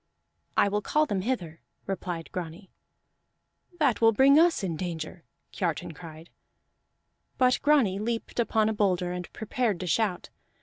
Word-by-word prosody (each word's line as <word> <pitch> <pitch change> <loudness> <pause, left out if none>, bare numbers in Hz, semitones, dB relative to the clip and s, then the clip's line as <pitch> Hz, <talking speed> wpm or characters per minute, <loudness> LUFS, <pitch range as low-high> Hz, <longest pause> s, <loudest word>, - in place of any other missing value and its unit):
"I - - +5
will 205 +1 0
call 305 +8 +2
them 200 -9 -2
hither," 185 -8 -3 0.2
replied 175 -4 -5
Grani. 180 +2 -7 1.1
"That 280 -10 +2
will 225 0 +6
bring 275 +6 +6
us 335 - +3
in 175 -4 -2
danger!" 165 0 -6 0.3
Kiartan 170 -3 -2
cried. 160 0 -12 1.1
But 255 -1 +3
Grani 265 -11 +3
leaped 230 +2 -3
upon 220 -2 +2
a 220 - 0
boulder 185 -4 +1
and 180 0 -6
prepared 220 -3 -2
to - - -3
shout. 185 0 -1
200 Hz, 140 wpm, -27 LUFS, 175-235 Hz, 1.1 s, will